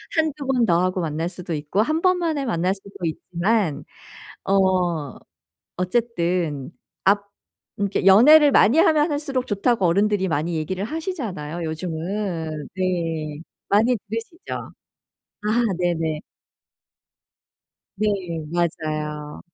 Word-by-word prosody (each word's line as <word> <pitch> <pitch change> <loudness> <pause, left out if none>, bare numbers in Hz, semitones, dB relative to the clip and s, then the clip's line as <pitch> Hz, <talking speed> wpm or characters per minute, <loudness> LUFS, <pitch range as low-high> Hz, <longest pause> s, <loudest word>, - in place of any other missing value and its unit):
한두 305 -3 0
번 250 -3 +3
더 175 -2 +3
하고 185 0 0
만날 165 +1 -2
수도 180 -2 -6
있고 150 +7 0
1 310 +7 0
번 370 -1 +3
만에 315 -5 -1
만날 185 -4 +1
수도 200 0 -14
있지만 175 +2 -1 0.6
어 180 -6 +1 0.6
어쨌든 180 - -1 0.3
앞 200 +1 +4 0.6
음 200 - +1
그러니까 190 - -1
연애를 285 +9 +8
많이 235 +9 +5
하면 310 -1 +4
할수록 275 -3 -2
좋다고 205 -1 +1
어른들이 200 +2 +2
많이 160 +2 -1
얘기를 185 +5 -3
하시잖아요. 220 - -4
요즘은. 160 -1 -3
네. 165 -5 -2 0.3
많이 230 +5 +3
들으시죠? 230 - -6 0.9
아 220 +3 +1
네네. 165 -3 -1 1.8
네. 215 +2 0 0.5
맞아요. 155 -3 -2
185 Hz, 235 characters per minute, -23 LUFS, 165-230 Hz, 1.8 s, 연애를